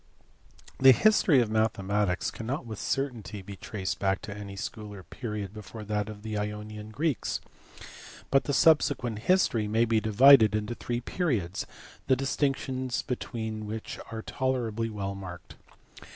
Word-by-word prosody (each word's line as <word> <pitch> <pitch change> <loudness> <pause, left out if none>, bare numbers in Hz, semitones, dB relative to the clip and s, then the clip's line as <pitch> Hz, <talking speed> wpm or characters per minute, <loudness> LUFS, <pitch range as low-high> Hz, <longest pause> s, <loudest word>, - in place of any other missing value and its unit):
THE 135 0 +9
history 180 - +5
of 110 -3 -1
mathematics 100 -3 +1
cannot 125 +4 -4
with 110 -3 -7
certainty 115 -8 -3
be 100 +1 -8
traced 95 -1 -4
back 95 0 +1
to 105 -1 -6
any 100 -1 -7
school 105 +1 -6
or 95 - -10
period 105 - -5
before 110 +1 -9
that 105 0 -2
of 105 -1 -9
the 110 -1 -3
Ionian 105 +1 -5
Greeks, 145 +4 -1 0.9
but 135 - +4
the - - -1
subsequent 135 -8 +3
history 120 - +2
may 110 +2 +3
be 110 -1 +2
divided 110 0 +7
into 105 +2 -2
three 120 0 -3
periods, 115 - -1 0.4
the 130 - +5
distinctions 130 -1 -1
between 110 -3 -4
which 110 +1 -6
are 110 -1 -5
tolerably 115 -4 -1
well 100 -2 -4
marked. 90 -3 -9
110 Hz, 145 wpm, -28 LUFS, 105-125 Hz, 0.9 s, THE